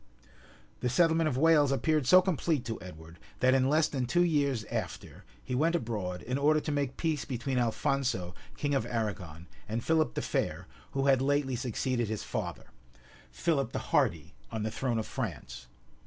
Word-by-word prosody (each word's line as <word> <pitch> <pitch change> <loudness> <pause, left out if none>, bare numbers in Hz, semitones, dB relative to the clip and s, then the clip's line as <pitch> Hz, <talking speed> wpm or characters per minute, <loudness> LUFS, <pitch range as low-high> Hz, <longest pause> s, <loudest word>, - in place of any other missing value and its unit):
} 60 0 -26
The 125 - +1
settlement 165 +3 +3
of 130 - -2
Wales 150 -2 +5
appeared 150 0 +1
so 185 +5 +7
complete 165 -6 0
to 115 -1 -4
Edward, 80 -2 -11 0.2
that 130 0 +4
in 130 0 +3
less 155 +2 +3
than 130 -4 -2
two 175 +7 +3
years 140 -8 +1
after, - - -5 0.2
he - - -5
went 160 +7 +2
abroad, 105 - -3
in 125 +3 -2
order 155 +2 +4
to 150 - -4
make 140 -3 -1
peace 160 -4 -1
between 130 +1 -2
Alphonso, 120 -5 0 0.2
king 145 -1 -1
of 135 -4 0
Arragon, 95 -9 -4 0.2
and 115 +2 -2
Philip 160 -1 +1
the - - -2
Fair, - - -2 0.3
who 135 0 0
had 135 -2 +4
lately 140 -1 +1
succeeded 120 -1 -1
his 110 0 -3
father, - - -5 0.6
Philip 140 -8 -1
the - - -4
Hardy, 85 +2 +1 0.2
on 110 -2 -3
the 110 - -2
throne 125 -1 -1
of 110 - -1
France. - - -5
130 Hz, 180 wpm, -30 LUFS, 110-150 Hz, 0.6 s, so